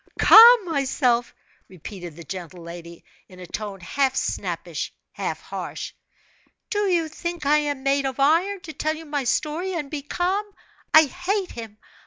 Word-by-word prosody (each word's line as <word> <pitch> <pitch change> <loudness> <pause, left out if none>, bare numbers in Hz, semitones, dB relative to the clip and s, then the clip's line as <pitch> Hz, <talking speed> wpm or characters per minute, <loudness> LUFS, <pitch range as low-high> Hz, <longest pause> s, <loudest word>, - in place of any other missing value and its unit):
"Calm 460 -1 +9
myself!" 265 -6 0 0.3
repeated 180 -2 -9
the 170 - -10
gentle 180 -1 -8
lady, 170 0 -10 0.3
in 185 -1 -14
a 180 - -8
tone 200 +2 -6
half 265 +8 0
snappish, - - -3 0.2
half - - -4
harsh, - - -6 0.8
"do 415 -1 +1
you 340 -3 +1
think 340 0 -6
I 295 +2 +4
am 290 -3 -3
made 275 0 +1
of 265 0 -6
iron, 345 +8 +2
to 325 -4 -9
tell 310 +1 -1
you 325 +1 -10
my 290 -3 -3
story 325 +8 -1
and 295 -4 -4
be 300 -2 -3
calm? 365 +8 -1 0.5
I 315 - +8
hate 360 +5 -2
him! 225 -3 -9
290 Hz, 160 wpm, -23 LUFS, 215-345 Hz, 0.8 s, Calm